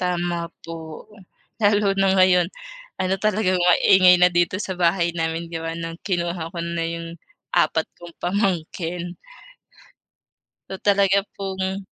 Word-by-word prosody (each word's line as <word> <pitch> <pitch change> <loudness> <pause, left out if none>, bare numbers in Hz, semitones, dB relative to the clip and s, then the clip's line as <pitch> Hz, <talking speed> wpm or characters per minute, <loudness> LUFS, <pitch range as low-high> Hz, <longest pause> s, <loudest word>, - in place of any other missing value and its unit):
Tama 175 -1 -2 0.2
po, 160 -1 -8
ugh, 210 -2 -16 0.4
lalo 205 -1 +3
na 195 - +3
ngayon, 180 -2 +4 0.5
ano 185 +1 +1
talagang 205 -3 +1
maingay 180 +1 +6
na 180 0 +5
dito 175 +1 +1
sa 190 - -4
bahay 170 0 +2
namin 165 0 -3
di 165 - -3
ba 165 0 -4
no'ng 165 0 -6
kinuha 170 -3 -2
ko - - -5
na 170 -1 -3
yung 165 0 -5 0.5
apat 160 +1 +2
kong 175 -1 -12
pamangkin. 175 -2 -2 1.6
'To 190 - -6
talaga 200 -1 +3
pong 190 0 -4
175 Hz, 135 wpm, -22 LUFS, 170-190 Hz, 1.6 s, maingay